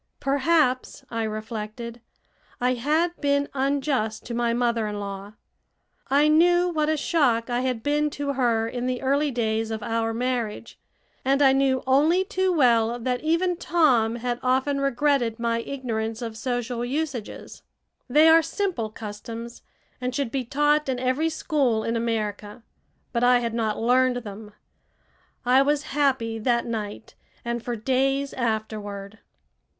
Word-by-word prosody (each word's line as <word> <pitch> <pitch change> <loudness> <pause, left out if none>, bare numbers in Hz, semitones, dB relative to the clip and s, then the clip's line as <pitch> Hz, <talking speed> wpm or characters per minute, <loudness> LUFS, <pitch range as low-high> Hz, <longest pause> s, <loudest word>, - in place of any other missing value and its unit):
Perhaps, 275 -1 +1
I 230 -1 -2
reflected, 220 +2 -5 0.6
I 250 +1 +2
had 310 +8 0
been 285 -1 +1
unjust 270 -5 -1
to 240 - -5
my 235 0 +1
mother 235 -2 0
in 210 -1 -4
law. 200 0 -6 0.8
I 285 +2 +4
knew 350 +3 +4
what 305 -2 0
a 315 - +1
shock 250 -8 +1
I 240 - +1
had 250 -3 -2
been 295 +1 +1
to 285 -1 -1
her 235 -4 +1
in 245 +1 -3
the 255 0 -2
early 285 +3 +2
days 225 -3 -1
of 220 -1 -4
our 225 0 -1
marriage, 235 -2 -3 0.4
and 275 +1 +2
I 270 -2 +6
knew 270 -1 +2
only 310 +8 +3
too 375 0 0
well 240 -7 +3
that 245 +1 -2
even 335 +3 +1
Tom 255 -11 +2
had 240 0 -3
often 265 +2 +1
regretted 275 -4 +1
my 230 -1 0
ignorance 230 -3 -4
of 225 -1 -5
social 245 0 -3
usages. 265 -3 -4 0.5
They 300 +5 +6
are 325 +1 +7
simple 330 - -2
customs, 225 +2 -8 0.4
and 250 0 -2
should 275 -5 -1
be 270 -2 -1
taught 295 +3 +2
in 260 - 0
every 260 +6 0
school 275 -8 0
in 230 - -1
America, 215 -2 -3 0.5
but 235 0 0
I 250 0 +6
had 235 -2 -2
not 220 -2 -1
learned 250 +2 +3
them. 210 0 -9 0.9
I 255 +2 +5
was 290 +1 +1
happy 260 -6 +1
that 235 +1 +1
night 220 -2 -5 0.3
and 235 0 -2
for 240 +1 -3
days 270 +4 0
afterward. 215 -3 -4
245 Hz, 150 wpm, -25 LUFS, 225-280 Hz, 0.9 s, are